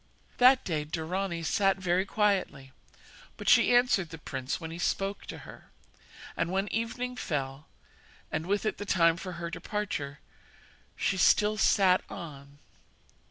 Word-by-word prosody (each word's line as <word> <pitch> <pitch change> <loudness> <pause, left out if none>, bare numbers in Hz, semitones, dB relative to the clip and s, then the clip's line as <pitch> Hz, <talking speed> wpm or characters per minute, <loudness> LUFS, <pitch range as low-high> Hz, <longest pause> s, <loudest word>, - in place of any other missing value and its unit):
That 255 +1 +6
day 155 -4 -2
Dorani 170 +3 -3
sat 195 +3 +2
very 185 0 +1
quietly, 190 -12 0 0.7
but - - -8
she 245 - +6
answered 240 -8 +3
the 160 - -8
prince 130 -3 -4
when 160 0 -7
he 170 - -7
spoke 195 +3 -2
to - - -8
her; - - -13 0.7
and 175 - -1
when 195 +2 0
evening 245 +3 -2
fell, 140 - -4 0.6
and 160 - -3
with 205 +2 0
it 215 - -2
the - - -3
time 165 -4 +3
for 180 +1 -7
her 170 0 -5
departure, 180 -6 -4 0.8
she 190 - 0
still 210 +3 +4
sat 190 -2 +4
on. 140 -4 -9
180 Hz, 145 wpm, -29 LUFS, 160-205 Hz, 0.8 s, That